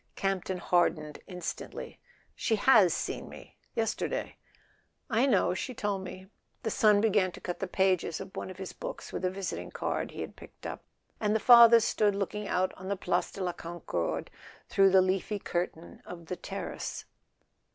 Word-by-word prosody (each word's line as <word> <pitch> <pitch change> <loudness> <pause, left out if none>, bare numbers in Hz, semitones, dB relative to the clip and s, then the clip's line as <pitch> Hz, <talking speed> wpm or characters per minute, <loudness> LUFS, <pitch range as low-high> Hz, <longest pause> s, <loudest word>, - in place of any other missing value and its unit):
Campton 190 -1 -1
hardened 165 -4 +1
instantly. 180 -2 -6 0.4
"She 225 - +1
has 210 -5 +6
seen - - -3
me— - - -13 0.2
yesterday." 230 - -2 0.7
"I 240 +5 +3
know; 250 - +3
she 235 +7 -4
told 205 -3 -2
me." 185 0 -8 0.4
The 225 - -1
son 210 -1 +4
began 205 -4 +3
to - - -9
cut 175 - -5
the 195 - -2
pages 185 -3 +1
of 190 - -9
one - - -4
of 185 - -9
his 190 -1 -6
books - - -7
with - - -4
a 185 - +2
visiting 190 0 -4
card - - -2
he - - -7
had - - -6
picked - - -14
up, - - -5 0.4
and 210 0 +1
the - - +3
father 235 0 +9
stood 210 -2 +2
looking 200 +1 -3
out 185 0 +1
on 185 - -8
the 200 0 -1
Place 175 -1 0
de 195 - -5
la 180 -1 -1
Concorde 165 - -4 0.4
through 195 0 +5
the 190 0 +6
leafy 190 +3 0
curtain 175 -3 -4
of 170 -1 -9
the 180 - -4
terrace. - - -5
190 Hz, 175 wpm, -30 LUFS, 180-210 Hz, 0.7 s, father